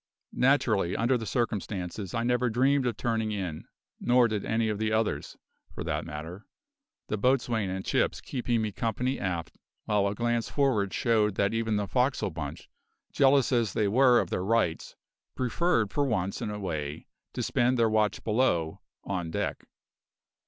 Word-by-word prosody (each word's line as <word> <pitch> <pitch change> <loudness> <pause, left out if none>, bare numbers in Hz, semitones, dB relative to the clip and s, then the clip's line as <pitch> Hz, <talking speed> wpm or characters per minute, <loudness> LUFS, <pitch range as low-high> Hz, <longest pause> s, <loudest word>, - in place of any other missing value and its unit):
Naturally, 115 -9 +2
under 120 +3 +2
the 115 -3 -3
circumstances 100 -4 -3
I 115 - 0
never 125 +1 +1
dreamed 130 +3 +2
of 120 - -2
turning 115 -2 -1
in; 90 -7 -4 0.3
nor 125 0 +4
did 105 -3 -2
any 110 0 0
of 105 -1 -2
the 110 0 0
others, 110 0 -1 0.4
for - - -4
that - - -2
matter, 80 +7 -8 0.6
the 105 - -2
boatswain 120 -4 +1
and 95 +1 -4
Chips - - +1
keeping 120 -3 -1
me 110 - -2
company 125 +5 -2
aft, 85 -4 -3 0.3
while 105 -2 +2
a 100 - -2
glance 120 0 0
for'ard 125 -9 +1
showed 110 -4 +1
that 100 +2 +1
even 115 -1 0
the 105 0 0
forecastle 125 -2 0
bunch, 75 -3 -6 0.5
jealous 135 -1 +4
as 115 -4 +1
they 105 - +1
were 125 +3 +5
of - - -2
their 90 - -1
"rights", 105 -6 0 0.4
preferred 125 - +1
for 145 - +2
once 100 -7 -1
in 115 - -2
a 105 - -4
way 75 -6 -4 0.3
to - - -3
spend 125 +1 +2
their 115 -1 +4
watch 110 -2 +1
below 105 -9 +1 0.2
on 90 -4 -3
deck. - - -3
110 Hz, 165 wpm, -28 LUFS, 100-120 Hz, 0.6 s, were